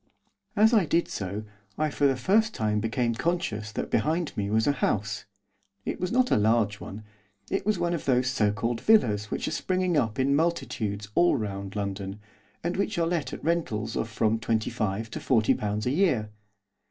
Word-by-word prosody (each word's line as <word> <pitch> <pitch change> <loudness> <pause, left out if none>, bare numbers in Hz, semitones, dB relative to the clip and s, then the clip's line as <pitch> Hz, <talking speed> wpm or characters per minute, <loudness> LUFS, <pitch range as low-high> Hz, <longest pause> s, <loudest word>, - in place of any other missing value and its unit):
As 220 +3 +5
I 205 -8 +4
did 170 +3 +2
so 100 +2 -4 0.3
I 155 -1 0
for 140 0 +2
the 135 - +2
first 210 - +2
time 105 -3 0
became 115 +2 0
conscious 110 -7 -2
that - - -4
behind 160 +1 0
me 100 -1 -2
was 110 +1 +2
a - - +4
house. 110 -6 -1 0.6
It - - -3
was 180 - -2
not 255 +1 +2
a - - +5
large 105 -1 +2
one. 105 +2 -8 0.5
It - - -1
was 215 -2 +2
one 175 0 0
of 165 - -3
those 125 -2 +3
so 110 -5 +2
called 115 +2 -2
villas 110 - +3
which - - -2
are - - -2
springing 185 -3 0
up 110 -6 0
in 135 +2 +2
multitudes 110 -11 -1
all 175 +4 +4
round 100 -4 -4
London, 100 0 -4 0.4
and 175 +2 -1
which 200 0 -1
are 170 - +2
let 165 -6 -1
at - - -7
rentals 115 -10 -1
of 115 - -1
from 110 0 +1
twenty 110 0 0
five 110 -1 -2
to - - -4
forty 110 -5 +3
pounds 105 0 -2
a 125 - +1
year. 135 - +1
115 Hz, 195 wpm, -27 LUFS, 105-170 Hz, 0.6 s, As